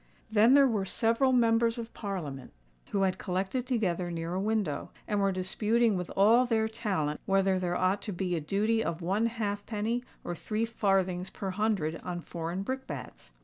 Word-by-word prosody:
Then 225 +5 +6
there 280 -1 +7
were 215 -5 0
several 230 +6 +2
Members 230 -1 +3
of 235 -1 -6
Parliament 165 - -5 0.4
who 200 -1 +1
had 185 -1 0
collected 195 +7 -2
together 185 -8 0
near 165 0 -4
a 185 - -1
window, 210 -7 -1 0.2
and 210 -1 0
were 195 -1 +2
disputing 210 +4 +2
with 180 -1 -3
all 230 +6 +5
their 220 -2 +2
talent 190 -10 -2
whether 195 -1 +3
there 175 -1 -1
ought 185 +2 +1
to 210 - -4
be 180 -1 -1
a 165 - -2
duty 215 +8 +1
of 165 +1 -3
one 200 +6 +1
halfpenny 220 +1 -2 0.2
or 175 - -3
three 215 +6 -2
farthings 190 -5 0
per 195 -1 -4
hundred 190 -6 0
on 175 -1 -5
foreign 170 +3 -4
brick 265 +4 -4
bats. - - -8
200 Hz, 180 wpm, -30 LUFS, 180-225 Hz, 0.4 s, there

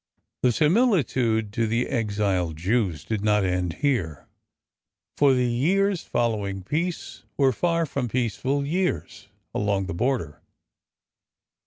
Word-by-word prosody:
The 125 - +4
similitude 135 - +2
to 115 0 0
the 115 +3 0
exiled 100 - -1
Jews 95 -1 0
did 110 -2 -2
not 105 -2 +3
end 90 -2 -1
here, 90 - -1 0.9
for 140 -2 +4
the 125 -1 +2
years 175 +10 +1
following 105 -5 -2
peace 155 - -3 0.2
were 135 -2 +4
far 165 +6 0
from 135 -5 -3
peaceful 130 +4 -1
years 145 -8 -2 0.3
along 100 -2 0
the 95 - -4
border. 110 - -2
115 Hz, 120 wpm, -25 LUFS, 100-140 Hz, 0.9 s, The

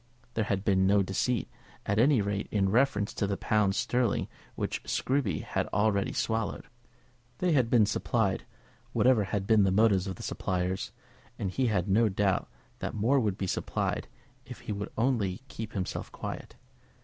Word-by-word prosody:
There 110 - 0
had 100 -1 -1
been 95 -2 +3
no 100 0 +4
deceit, 105 +6 0 0.4
at 100 +1 +1
any 130 -1 +5
rate, 100 0 -2
in 95 -2 +1
reference 110 -2 +2
to 100 - -1
the 100 0 -1
pounds 105 -2 +1
sterling 125 -3 +1 0.3
which - - -2
Scruby 130 - 0
had - - -2
already 100 0 +1
swallowed. 110 -4 -1 0.7
They 180 -1 +1
had 130 -7 +3
been 115 -3 +5
supplied, 110 -1 0 0.5
whatever 120 -2 +4
had 95 +1 -2
been 110 0 +5
the 95 - +4
motives 100 -2 +3
of 95 - -4
the - - -10
suppliers; 90 +1 -2 0.5
and 95 - -2
he 130 +5 +1
had 100 -4 0
no 110 +3 +4
doubt 95 -1 0 0.3
that - - -4
more 120 +7 +3
would 105 -5 0
be 95 - -2
supplied 90 - -2 0.4
if - - -10
he - - -5
would 100 0 -3
only 115 -5 0
keep 115 -4 -6
himself 95 -3 -4
quiet. - - -7
105 Hz, 170 wpm, -29 LUFS, 95-115 Hz, 0.7 s, any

